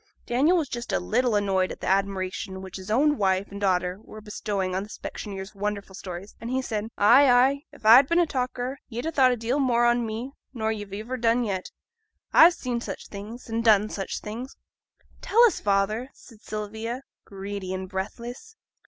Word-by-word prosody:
Daniel 285 +9 +3
was 315 -4 0
just 240 -1 -5
a - - +1
little 235 +5 +1
annoyed 195 -2 +1
at - - -8
the - - -6
admiration 190 0 -1
which 190 0 -8
his 190 +1 -10
own 290 +6 +3
wife 190 0 +1
and 200 0 -7
daughter 180 -1 +1
were 215 - -11
bestowing 205 -3 -3
on 190 - 0
the 205 - -8
specksioneer's 195 -2 -7
wonderful 200 -1 -4
stories, 185 0 -8
and 230 - -5
he 260 +1 0
said 220 -4 -3
'Ay, 255 +7 +6
ay. 265 +3 +4
If - - -17
a'd 245 +5 +8
been 335 - +2
a 350 - +5
talker, 255 -1 -3
ye'd 240 +3 -5
ha' 325 - -2
thought 260 -3 +5
a 245 - 0
deal 235 +5 -1
more 240 -3 +3
on 240 0 +3
me 225 +4 -4 0.2
nor 220 -1 0
ye've 205 -2 -6
iver 220 +6 -4
done 235 +1 +2
yet. 190 -4 -3 0.6
A've 340 +1 +8
seen 245 -2 -3
such - - -7
things, 215 +4 -9
and 230 0 -2
done 215 -2 +5
such 195 -2 -4
things.' 235 +5 -7 0.6
'Tell 465 +3 +4
us, 470 - +4
father!' 210 +5 0
said 225 -4 -17
Sylvia, 220 +4 -5 0.2
greedy 195 -1 -6
and 185 0 -4
breathless. 235 - -6
220 Hz, 195 wpm, -26 LUFS, 195-250 Hz, 0.6 s, a'd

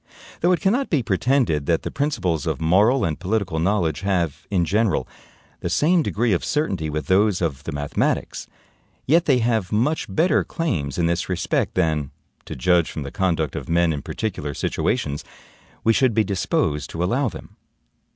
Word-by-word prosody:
Though 175 - +3
it 180 - +1
cannot 240 +8 +1
be 145 -7 +1
pretended 105 - +1
that 85 -1 +1
the - - -4
principles 95 - -1
of - - -1
moral 100 +10 +3
and 80 -2 -2
political 95 -3 -1
knowledge 85 -3 0
have, 90 -6 -1
in 90 -4 +1
general, 105 +2 +1 0.5
the - - -3
same 160 - +3
degree 115 -6 0
of 85 - 0
certainty 95 - -1
with 75 0 -3
those 100 0 +3
of 75 -5 -3
the - - -3
mathematics, 75 -1 -2 0.6
yet 165 +4 +3
they 135 -4 +4
have 115 -5 0
much 125 +9 0
better 170 +4 +2
claims 85 - -2
in 85 - +1
this 85 +2 -1
respect 90 -1 -1
than, 80 -6 +1 0.4
to - - -6
judge 85 +5 +2
from 75 - -5
the 70 - -7
conduct 85 -6 0
of - - -6
men 85 -1 +3
in 70 - -4
particular 75 -9 -4
situations, 70 +3 -1 0.6
we 115 - +4
should 125 -2 +2
be 110 - +4
disposed 80 -6 -1
to 85 - -3
allow 125 +8 +1
them. - - -11
95 Hz, 175 wpm, -22 LUFS, 80-120 Hz, 0.6 s, they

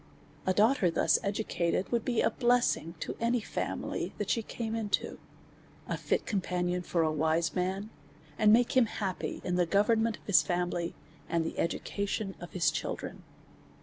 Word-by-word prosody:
A 185 - +4
daughter 215 -2 +4
thus 165 - +3
educated 200 -3 -1
would 235 -2 +1
be 240 -3 +1
a - - +2
blessing 240 -9 +2
to - - -3
any 235 +1 +2
family 210 - -3
that - - -1
she 230 - +1
came 225 0 -5
into; 220 -3 -1 0.7
a - - -1
fit - - -1
companion 180 -3 -1
for 170 -1 0
a 155 - +2
wise 160 +2 +1
man, 190 +4 -2 0.4
and 215 -1 +5
make 240 +3 +4
him 255 -3 +5
happy 195 -4 -3
in 180 0 -1
the 175 -1 +2
government 220 +4 +2
of - - -25
his 205 - +6
family, 175 -1 -1 0.3
and 165 -1 +1
the - - -4
education 200 +3 -2
of 175 - -9
his 165 -5 +2
children. 165 - -4
195 Hz, 165 wpm, -30 LUFS, 175-225 Hz, 0.7 s, his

